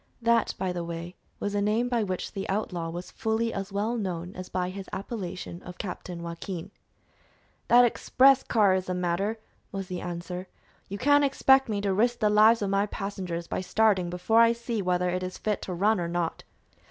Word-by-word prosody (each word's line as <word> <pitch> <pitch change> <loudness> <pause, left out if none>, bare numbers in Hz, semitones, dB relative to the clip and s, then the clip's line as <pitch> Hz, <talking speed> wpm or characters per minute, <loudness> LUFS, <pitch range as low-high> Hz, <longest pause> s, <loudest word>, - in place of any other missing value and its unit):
That, 230 -1 +2
by 185 -1 -1
the 175 -1 -3
way, 170 +1 -6 0.2
was 205 - -2
a 205 - +1
name 215 +4 +1
by 240 -2 +1
which 185 -3 -3
the 195 -1 -5
outlaw 180 -4 -2
was 175 +2 -7
fully 225 -1 -1
as 195 0 -4
well 210 +4 -1
known 180 -3 -4
as 185 0 -7
by 180 0 -2
his 195 0 -8
appellation 185 -4 -5
of 180 0 -10
Captain 180 -3 -6
Joaquin. 170 +1 -6 1.0
"That 245 +1 +7
express 265 +3 +4
car 210 -5 +3
is 185 0 0
the 180 - -1
matter," 180 +5 -1 0.3
was 195 -1 -5
the 180 -1 -4
answer. 180 +1 -5 0.4
"You 200 - -4
can't 285 +5 +4
expect 270 -2 +4
me 205 -2 -1
to 200 -1 0
risk 235 +5 +2
the 210 -2 +2
lives 215 +1 +6
of 195 - -1
my 200 +1 +2
passengers 185 -4 -4
by - - -3
starting 190 -1 +2
before 180 +6 +2
I 230 0 +6
see 235 -2 -3
whether 180 -1 +1
it 180 +1 -1
is 185 0 -5
fit 210 -2 -2
to 185 - -5
run 205 +3 +2
or 170 - -1
not." 170 -1 -2
195 Hz, 200 wpm, -27 LUFS, 180-220 Hz, 1.0 s, That